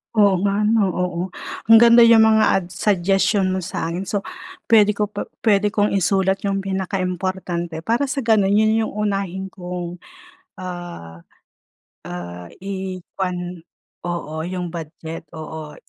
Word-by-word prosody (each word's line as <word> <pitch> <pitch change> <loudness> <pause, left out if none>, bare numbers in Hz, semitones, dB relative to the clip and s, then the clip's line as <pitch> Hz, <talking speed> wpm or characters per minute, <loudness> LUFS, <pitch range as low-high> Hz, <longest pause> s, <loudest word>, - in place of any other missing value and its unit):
Oo 205 -3 +5
nga 200 0 +1
ano, 210 -2 +2
oo, 180 -1 -2 0.5
ang 225 - +11
ganda 235 0 +8
yung 230 -1 +7
mga 220 0 +4 0.2
ads 180 -1 -11
suggestion 195 0 +2
mo 185 0 -1
sa 165 - -3
akin, 170 +3 -3
so, 200 +1 -2 0.5
puwede 210 -3 +6
ko 210 0 -1
pa 205 0 -5 0.2
puwede 205 -2 +2
kong 205 0 +1
isulat 190 0 +2
yung 195 -1 0
pinaka 195 0 -2
importante 180 -2 -3
para 230 - 0
sa 280 - -1
ganon, 220 -5 +3
yun 220 +2 +3
yung - - -4
unahin 195 -3 -2
kong 180 -2 -7 0.5
ah, 175 - -8 0.9
ah, 90 0 -7 0.2
i-kuwan 185 -2 -4 0.5
oo, 170 -3 -4
yung 180 -1 -4
budget, 165 0 -7
oo, 155 -1 -7
190 Hz, 140 wpm, -21 LUFS, 175-205 Hz, 0.9 s, ang